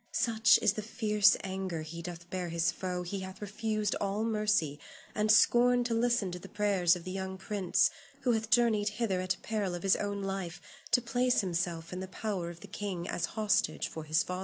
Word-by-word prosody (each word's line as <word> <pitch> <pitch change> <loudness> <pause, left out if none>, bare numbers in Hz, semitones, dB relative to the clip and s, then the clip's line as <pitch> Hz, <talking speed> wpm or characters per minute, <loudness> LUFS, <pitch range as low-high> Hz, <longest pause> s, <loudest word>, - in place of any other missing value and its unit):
Such 225 -1 +4
is 200 - +4
the 215 - -4
fierce 210 -1 +3
anger 190 -4 -3
he 165 +2 -7
doth 175 0 -8
bear 180 -2 -3
his 165 -1 +1
foe 180 -1 -4
he 195 +3 -4
hath 190 0 -8
refused 215 0 -2
all 200 +2 -1
mercy 210 -9 +1 0.3
and 215 0 +2
scorned 245 +2 +5
to 235 - -1
listen 230 -4 +1
to 180 - -6
the - - -11
prayers 195 -4 +2
of 175 - -8
the 185 - -6
young 190 0 -4
prince 190 -2 +1 0.3
who 250 - +2
hath 220 -1 -1
journeyed 220 -3 +3
hither 200 -6 0
at 185 0 -1
peril 205 -5 -2
of 175 - -7
his 195 0 +4
own 200 -1 -3
life 195 -3 -4 0.3
to 245 - +3
place 245 +1 +2
himself 175 -2 -2
in 180 - -4
the 190 - -5
power 190 -3 -3
of 170 0 -11
the 205 - -10
king 195 -3 -4
as 170 - -1
hostage 205 -7 +1
for 160 - -7
his 155 +1 +2
father. 180 0 -4
195 Hz, 210 wpm, -31 LUFS, 180-215 Hz, 0.3 s, scorned